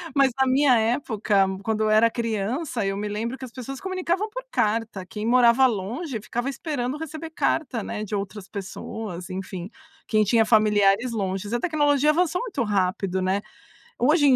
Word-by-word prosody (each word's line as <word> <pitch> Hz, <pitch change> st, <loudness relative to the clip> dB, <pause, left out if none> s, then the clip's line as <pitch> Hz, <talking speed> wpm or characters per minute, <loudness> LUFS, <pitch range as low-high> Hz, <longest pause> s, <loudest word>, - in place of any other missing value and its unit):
mas 275 Hz, -2 st, +4 dB
na 265 Hz, -, +4 dB
minha 260 Hz, -1 st, +4 dB
época, 220 Hz, -4 st, +1 dB, 0.2 s
quando 220 Hz, +1 st, 0 dB
eu 215 Hz, -, +2 dB
era 215 Hz, +2 st, +5 dB
criança, 230 Hz, +3 st, -2 dB
eu 195 Hz, 0 st, -1 dB
me 210 Hz, +1 st, -3 dB
lembro 230 Hz, +5 st, -3 dB
que -, -, -11 dB
as 250 Hz, -, -12 dB
pessoas 260 Hz, +2 st, -7 dB
se -, -, -19 dB
comunicavam 375 Hz, +2 st, -1 dB
por -, -, -6 dB
carta. 215 Hz, -3 st, 0 dB
Quem 210 Hz, +4 st, -6 dB
morava 245 Hz, +2 st, +5 dB
longe, 235 Hz, -, -3 dB
ficava 240 Hz, +5 st, -3 dB
esperando 275 Hz, -2 st, -3 dB
receber 320 Hz, +1 st, -7 dB
carta, 260 Hz, -7 st, -1 dB
né, 210 Hz, -, -4 dB
de 210 Hz, -, -3 dB
outras 200 Hz, 0 st, -5 dB
pessoas, 195 Hz, -2 st, -6 dB
enfim. 185 Hz, 0 st, -6 dB, 0.4 s
Quem 215 Hz, -1 st, +3 dB
tinha 225 Hz, +2 st, +4 dB
familiares 215 Hz, +1 st, +4 dB
longes. 195 Hz, 0 st, -3 dB
A 240 Hz, -, +1 dB
tecnologia 295 Hz, -2 st, +2 dB
avançou 360 Hz, +2 st, +1 dB
muito 430 Hz, -, -2 dB
rápido, 190 Hz, -2 st, 0 dB
né. 190 Hz, +2 st, +1 dB, 0.6 s
Hoje 295 Hz, +4 st, +4 dB
em 265 Hz, -, +6 dB
230 Hz, 175 wpm, -24 LUFS, 205-275 Hz, 0.6 s, em